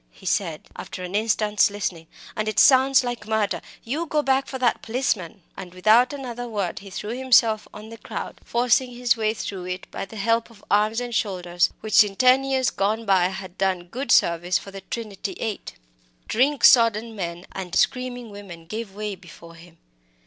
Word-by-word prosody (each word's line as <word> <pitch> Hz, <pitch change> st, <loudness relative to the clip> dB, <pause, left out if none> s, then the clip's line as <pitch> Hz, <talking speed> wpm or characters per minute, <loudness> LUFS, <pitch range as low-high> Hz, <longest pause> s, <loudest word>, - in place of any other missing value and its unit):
he 190 Hz, -, -19 dB
said, 175 Hz, -4 st, -1 dB
after 185 Hz, -, -7 dB
an 180 Hz, +1 st, -6 dB
instant's 210 Hz, -1 st, +2 dB
listening, 185 Hz, -5 st, -4 dB, 0.3 s
"and 215 Hz, 0 st, -2 dB
it 215 Hz, -, -3 dB
sounds 265 Hz, 0 st, +6 dB
like 240 Hz, -4 st, -5 dB
murder. 220 Hz, -2 st, 0 dB, 0.2 s
You 300 Hz, +8 st, -3 dB
go 300 Hz, -1 st, 0 dB
back 270 Hz, 0 st, +1 dB
for 265 Hz, -, -5 dB
that 250 Hz, -2 st, +1 dB
policeman!" 215 Hz, -7 st, -2 dB
And 185 Hz, -1 st, -9 dB
without 220 Hz, +8 st, +4 dB
another 245 Hz, -4 st, -6 dB
word 200 Hz, -5 st, -3 dB
he 200 Hz, -, -12 dB
threw 210 Hz, +3 st, -5 dB
himself 235 Hz, -4 st, +3 dB
on 215 Hz, +1 st, -11 dB
the 230 Hz, -, -11 dB
crowd, -, -, -7 dB
forcing 245 Hz, +1 st, +1 dB
his 245 Hz, 0 st, +1 dB
way 220 Hz, -1 st, 0 dB
through 190 Hz, -4 st, -5 dB
it 180 Hz, 0 st, -5 dB
by -, -, -5 dB
the 210 Hz, -, -13 dB
help 230 Hz, +3 st, 0 dB
of 215 Hz, -3 st, -19 dB
arms 215 Hz, +3 st, +2 dB
and 245 Hz, -1 st, -5 dB
shoulders 180 Hz, -5 st, 0 dB
which, 215 Hz, 0 st, +5 dB
in 200 Hz, -2 st, -7 dB, 0.3 s
years 265 Hz, -2 st, +1 dB
gone 215 Hz, +3 st, -1 dB
by, 190 Hz, -3 st, +4 dB
had 190 Hz, -1 st, -8 dB
done 185 Hz, -2 st, -1 dB
good 260 Hz, +8 st, -3 dB
service 170 Hz, +1 st, +3 dB
for 195 Hz, -, -10 dB
the 195 Hz, 0 st, -9 dB
Trinity 205 Hz, -4 st, -6 dB
Eight. 215 Hz, +1 st, -5 dB, 0.5 s
Drink 270 Hz, +3 st, +1 dB
sodden 230 Hz, -1 st, +5 dB
men 175 Hz, -2 st, -5 dB
and 185 Hz, -3 st, -6 dB
screaming 250 Hz, -3 st, 0 dB
women 190 Hz, -5 st, -10 dB
gave 215 Hz, +2 st, -6 dB
way 210 Hz, 0 st, -4 dB
before 170 Hz, -2 st, -13 dB
him. 165 Hz, 0 st, -16 dB
215 Hz, 185 wpm, -24 LUFS, 190-240 Hz, 0.5 s, sounds